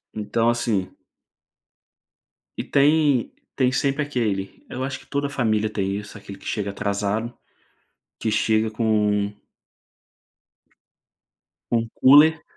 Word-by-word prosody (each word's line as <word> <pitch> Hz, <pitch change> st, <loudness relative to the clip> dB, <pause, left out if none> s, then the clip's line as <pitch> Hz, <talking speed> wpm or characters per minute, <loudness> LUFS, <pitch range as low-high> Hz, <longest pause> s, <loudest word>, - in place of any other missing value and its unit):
Então 115 Hz, +2 st, 0 dB
assim 110 Hz, -6 st, 0 dB, 1.7 s
E -, -, -3 dB
tem 145 Hz, -3 st, +3 dB, 0.2 s
tem 130 Hz, -2 st, +2 dB
sempre 140 Hz, +3 st, 0 dB
aquele, 110 Hz, -9 st, -3 dB
eu 130 Hz, -, -5 dB
acho 135 Hz, 0 st, -3 dB
que -, -, -19 dB
toda 140 Hz, 0 st, -1 dB
a -, -, -6 dB
família 110 Hz, -5 st, 0 dB
tem 100 Hz, -2 st, -2 dB
isso, 105 Hz, 0 st, -9 dB
aquele 100 Hz, -1 st, -10 dB
que -, -, -16 dB
chega 100 Hz, -2 st, -2 dB
atrasado, 100 Hz, +4 st, -2 dB, 0.8 s
que 110 Hz, -, -1 dB
chega 110 Hz, +1 st, +2 dB
com 105 Hz, -2 st, +1 dB, 2.4 s
com 115 Hz, -1 st, +1 dB
cooler 150 Hz, +4 st, +7 dB
110 Hz, 115 wpm, -23 LUFS, 105-130 Hz, 2.4 s, cooler